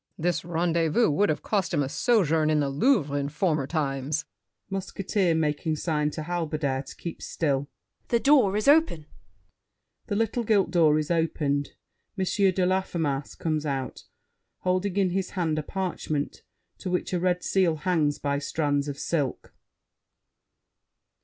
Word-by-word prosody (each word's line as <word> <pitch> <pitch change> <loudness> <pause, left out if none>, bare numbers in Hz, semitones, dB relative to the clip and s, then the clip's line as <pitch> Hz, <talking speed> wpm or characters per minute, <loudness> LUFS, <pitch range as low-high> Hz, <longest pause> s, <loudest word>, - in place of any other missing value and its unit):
This 170 0 0
rendezvous 170 +3 +1
Would 200 +8 +2
have 155 - -1
cost 195 -5 0
him 145 - +2
a - - -2
sojourn 160 - +2
in 155 -1 +3
the 140 -1 +1
Louvre, 150 - +2
In 140 0 -1
former 155 -3 0
times. 145 -1 -2 0.5
MUSKETEER 195 -2 0
(making 155 0 0
sign 150 -1 0
to 155 +1 -5
Halberdier 155 -5 -1
to - - -9
keep 170 - -7
still). 145 -3 -1 0.4
The 235 - +2
door 245 -8 +4
is 215 - -1
open. 290 - +4 1.0
[The 205 - -1
little 225 +2 0
gilt 205 -4 +2
door 155 -3 +4
is 155 +1 -2
opened. 150 -4 0 0.4
M. 190 - 0
de 190 -1 +2
Laffemas 170 -7 -1
comes 155 -2 -1
out, 135 -3 -4 0.6
holding 185 +1 0
in 190 -3 +2
his 190 0 -1
hand 160 -3 0
a - - -1
parchment 155 -4 -3 0.4
to 185 - -4
which 180 +1 -1
a 180 - +1
red 180 0 0
seal 185 -4 +2
hangs 155 -3 +1
by 140 0 -1
strands 145 -1 -1
of 140 -1 -4
silk. 145 -4 -2
165 Hz, 150 wpm, -26 LUFS, 150-185 Hz, 1.0 s, door